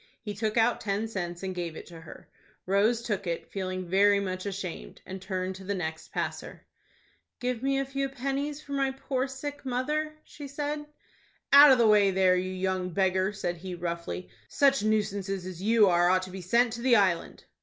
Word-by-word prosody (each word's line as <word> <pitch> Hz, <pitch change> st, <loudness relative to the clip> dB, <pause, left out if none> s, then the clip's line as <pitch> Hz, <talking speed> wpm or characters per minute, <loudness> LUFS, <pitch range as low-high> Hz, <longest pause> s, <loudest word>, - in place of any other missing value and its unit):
He 210 Hz, -3 st, -6 dB
took 215 Hz, +2 st, -2 dB
out 235 Hz, +1 st, +3 dB
ten 205 Hz, +2 st, -1 dB
cents, 175 Hz, -4 st, -5 dB
and 190 Hz, -1 st, -3 dB
gave 170 Hz, -3 st, -4 dB
it -, -, -9 dB
to 165 Hz, -2 st, -12 dB
her. 165 Hz, -, -13 dB, 0.4 s
Rose 215 Hz, +5 st, +2 dB
took 205 Hz, -5 st, -3 dB
it, 170 Hz, -1 st, -4 dB
feeling 185 Hz, -1 st, -3 dB
very 200 Hz, +3 st, +4 dB
much 185 Hz, 0 st, -4 dB
ashamed, 190 Hz, -3 st, -6 dB
and 190 Hz, 0 st, -7 dB
turned 185 Hz, -1 st, -3 dB
to 190 Hz, -, -11 dB
the 200 Hz, +1 st, -2 dB
next 160 Hz, -3 st, -5 dB
passer. -, -, -5 dB, 0.7 s
"Give 250 Hz, -2 st, -2 dB
me 270 Hz, +1 st, +1 dB
a 275 Hz, -, 0 dB
few 275 Hz, 0 st, -2 dB
pennies 275 Hz, +3 st, -3 dB
for 285 Hz, -, -12 dB
my 275 Hz, -1 st, +1 dB
poor 265 Hz, 0 st, -2 dB
sick 285 Hz, +2 st, -7 dB
mother," 300 Hz, +5 st, -2 dB
she 290 Hz, -1 st, -10 dB
said. 295 Hz, +1 st, -4 dB, 0.7 s
"Out 285 Hz, 0 st, +10 dB
of 260 Hz, -, +6 dB
the 235 Hz, -, +4 dB
way 210 Hz, -2 st, +5 dB
there, 185 Hz, -1 st, +3 dB
you 185 Hz, +1 st, -1 dB
young 185 Hz, 0 st, -2 dB
beggar!" 190 Hz, +1 st, +1 dB
said 175 Hz, -4 st, -3 dB
he, 180 Hz, +1 st, -6 dB
roughly. 170 Hz, +1 st, -5 dB, 0.2 s
"Such 275 Hz, -3 st, +3 dB
nuisances 200 Hz, -3 st, -1 dB
as 185 Hz, -2 st, -7 dB
you 215 Hz, 0 st, +5 dB
are 175 Hz, -1 st, +4 dB
ought 185 Hz, 0 st, +3 dB
to 185 Hz, -, -8 dB
be 190 Hz, 0 st, -7 dB
sent 235 Hz, +6 st, +2 dB
to 235 Hz, -, -6 dB
the 250 Hz, -1 st, +4 dB
Island." 185 Hz, -5 st, +1 dB
200 Hz, 195 wpm, -28 LUFS, 185-255 Hz, 0.7 s, Out